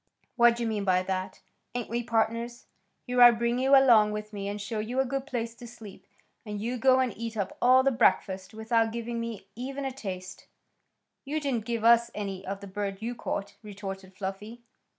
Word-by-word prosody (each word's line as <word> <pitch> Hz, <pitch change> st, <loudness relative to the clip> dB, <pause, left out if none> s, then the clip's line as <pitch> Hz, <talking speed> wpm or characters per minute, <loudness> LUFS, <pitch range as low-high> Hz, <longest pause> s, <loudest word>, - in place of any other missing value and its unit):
What 235 Hz, -1 st, +5 dB
d'you 235 Hz, 0 st, -3 dB
mean 215 Hz, -3 st, -1 dB
by 185 Hz, -1 st, +2 dB
that? 185 Hz, 0 st, -4 dB, 0.3 s
Ain't 245 Hz, -2 st, -2 dB
we 235 Hz, +2 st, -2 dB
pardners? 230 Hz, +1 st, -1 dB, 0.4 s
Here 250 Hz, -1 st, +1 dB
I 240 Hz, -, +12 dB
bring 235 Hz, +1 st, 0 dB
you 270 Hz, +2 st, +5 dB
along 225 Hz, -6 st, +6 dB
with 210 Hz, 0 st, -6 dB
me, 200 Hz, -1 st, -4 dB
and 205 Hz, +1 st, -4 dB
show 210 Hz, +2 st, -4 dB
you 235 Hz, +5 st, -2 dB
a 265 Hz, -, +3 dB
good 270 Hz, +1 st, -3 dB
place 235 Hz, -4 st, -3 dB
to 240 Hz, +1 st, -11 dB
sleep, 225 Hz, -4 st, -12 dB, 0.4 s
and 210 Hz, -3 st, -5 dB
you 240 Hz, +4 st, -3 dB
go 260 Hz, +1 st, +5 dB
and 255 Hz, -4 st, 0 dB
eat 230 Hz, 0 st, -5 dB
up 200 Hz, -2 st, -2 dB
all 255 Hz, +1 st, +6 dB
the 275 Hz, -, +3 dB
breakfast 190 Hz, -6 st, +1 dB
without 225 Hz, +1 st, +1 dB
giving 235 Hz, 0 st, -4 dB
me 230 Hz, -4 st, -5 dB
even 270 Hz, +4 st, -5 dB
a 270 Hz, -, -2 dB
taste." 190 Hz, -6 st, -7 dB, 0.8 s
"You 295 Hz, +3 st, -2 dB
didn't 260 Hz, -7 st, -2 dB
give 230 Hz, -1 st, -2 dB
us 235 Hz, 0 st, +5 dB
any 195 Hz, -2 st, -4 dB
of 195 Hz, +1 st, -4 dB
the -, -, -8 dB
bird 200 Hz, +1 st, -4 dB
you 235 Hz, +2 st, -2 dB
caught," 200 Hz, -3 st, -4 dB
retorted 195 Hz, -3 st, -8 dB
Fluffy. 205 Hz, +4 st, -6 dB
230 Hz, 200 wpm, -28 LUFS, 200-240 Hz, 0.8 s, I